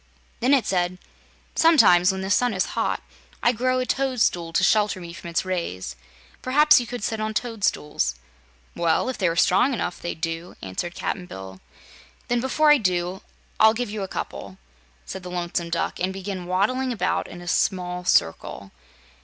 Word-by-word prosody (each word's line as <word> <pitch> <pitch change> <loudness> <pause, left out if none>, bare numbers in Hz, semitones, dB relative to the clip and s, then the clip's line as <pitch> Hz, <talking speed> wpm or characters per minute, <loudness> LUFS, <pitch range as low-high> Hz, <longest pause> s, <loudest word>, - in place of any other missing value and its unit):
Then 260 +4 +4
it 250 -6 +1
said: 180 -2 0 0.6
"Sometimes, 205 - +6
when 190 0 -4
the 190 +1 -3
sun 245 0 +2
is 185 - +1
hot, - - -1 0.4
I 240 - +5
grow 255 +2 0
a 255 - 0
toadstool 250 -12 0
to - - +2
shelter 210 -3 +3
me 170 -1 -8
from 170 - -8
its 170 - -1
rays. 170 - -3 0.5
Perhaps 295 +3 +5
you 240 - -4
could 245 -3 -6
sit 220 0 -2
on 215 0 -3
toadstools." 210 - -1 0.6
"Well, 170 +8 +1
if 260 - -5
they 185 -4 +2
were 165 - -2
strong 205 +10 +3
enough, 180 -4 -4
they'd 170 -2 -5
do," 165 +1 -4
answered 95 - -5
Cap'n 180 -2 -3
Bill. 95 - -9 0.7
"Then, 240 0 +2
before 300 +4 +3
I 295 - +6
do 185 -2 -1 0.4
I'll 220 0 +6
give 245 -2 -3
you 210 -1 -4
a 195 - -3
couple," 95 - -6 0.5
said 190 - -6
the 180 - -8
Lonesome 175 -1 -3
Duck, 170 0 -2
and 185 +1 0
began 190 -2 -5
waddling 250 +8 +1
about 230 - -1
in 175 - -10
a 175 - -11
small 180 0 0
circle. 95 - 0
185 Hz, 180 wpm, -24 LUFS, 175-240 Hz, 0.7 s, Sometimes